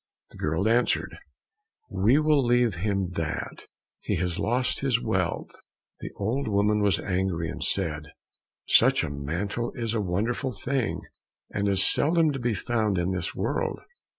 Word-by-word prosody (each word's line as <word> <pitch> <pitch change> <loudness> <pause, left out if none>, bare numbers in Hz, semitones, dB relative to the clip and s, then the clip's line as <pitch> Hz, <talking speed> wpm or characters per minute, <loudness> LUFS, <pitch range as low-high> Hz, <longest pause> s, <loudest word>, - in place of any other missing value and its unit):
The - - -14
girl 80 +7 0
answered, 120 +2 +1 0.7
"We 110 +4 +3
will 150 -2 +3
leave 120 -2 +3
him 95 0 -1
that, 80 -3 -4 0.3
he 105 - -2
has 90 0 -2
lost 125 +5 0
his 130 -4 +1
wealth." 95 -7 -2 0.5
The - - -6
old 115 +7 -2
woman 105 0 +2
was 100 -2 +2
angry 90 -3 -1
and - - -5
said, 75 -1 -2 0.6
"Such - - +4
a - - -3
mantle 85 +12 -3
is 115 -2 -2
a 110 - 0
wonderful 110 +8 -1
thing, 135 0 -1 0.5
and 100 0 -1
is 95 -1 +6
seldom 160 0 +4
to 135 - -4
be 120 -2 0
found 110 -4 0
in 85 +2 0
this 90 -2 -3
world. - - -2
105 Hz, 150 wpm, -26 LUFS, 90-120 Hz, 0.7 s, is